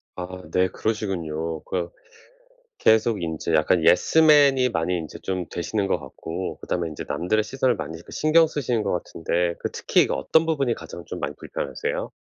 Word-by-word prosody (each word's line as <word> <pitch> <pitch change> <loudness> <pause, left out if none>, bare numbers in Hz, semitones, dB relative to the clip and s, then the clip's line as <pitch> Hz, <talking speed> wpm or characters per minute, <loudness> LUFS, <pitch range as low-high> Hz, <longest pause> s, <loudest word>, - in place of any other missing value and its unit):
아 90 -1 -5 0.2
네. 90 +1 +3
그러시군요. 85 -7 -3
그 85 -2 -3 0.9
계속 110 - +3
인제 80 0 -3
약간 80 +2 +3
예스맨이 140 - +5
많이 90 -2 0
인제 80 -3 -7
좀 95 -2 -3
되시는 100 +3 -2
것 90 - 0
같고 85 +5 -6
그다음에 85 -1 -2
인제 75 - -7
남들의 110 +5 0
시선을 130 +3 0
많이 80 +2 -6
이렇게 80 - -12
신경 160 +2 +4
쓰시는 125 -7 -1
것 100 - -1
같은데 85 0 -1
그 - - -3
특히 - - +2
그 - - -1
어떤 160 0 +2
부분이 140 -7 +1
가장 85 - -9
좀 - - -6
많이 - - -3
불편하세요? - - -4
90 Hz, 360 characters per minute, -24 LUFS, 85-120 Hz, 0.9 s, 예스맨이